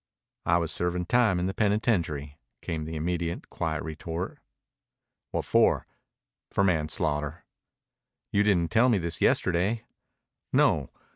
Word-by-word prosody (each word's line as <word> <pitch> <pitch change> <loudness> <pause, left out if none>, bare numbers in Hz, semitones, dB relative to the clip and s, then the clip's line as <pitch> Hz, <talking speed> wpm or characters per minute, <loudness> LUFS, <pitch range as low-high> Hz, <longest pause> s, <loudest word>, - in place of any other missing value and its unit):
"I 85 - +5
was 85 -2 -1
serving 90 +1 -1
time 110 -3 +3
in 90 - 0
the 95 - -1
penitentiary," 90 - 0 0.2
came 80 -3 -3
the 80 +1 -5
immediate 85 +1 -3
quiet 80 -1 -2
retort. 80 +3 -5 0.9
"What - - -2
for?" - - +3 0.6
"For 100 - +1
manslaughter." 75 -3 0 0.9
"You 100 - +3
didn't 90 -5 +2
tell 120 +3 +5
me 115 - +4
this 85 -2 -2
yesterday." 95 +6 +2 0.7
"No. - - +3
85 Hz, 125 wpm, -27 LUFS, 80-100 Hz, 0.9 s, I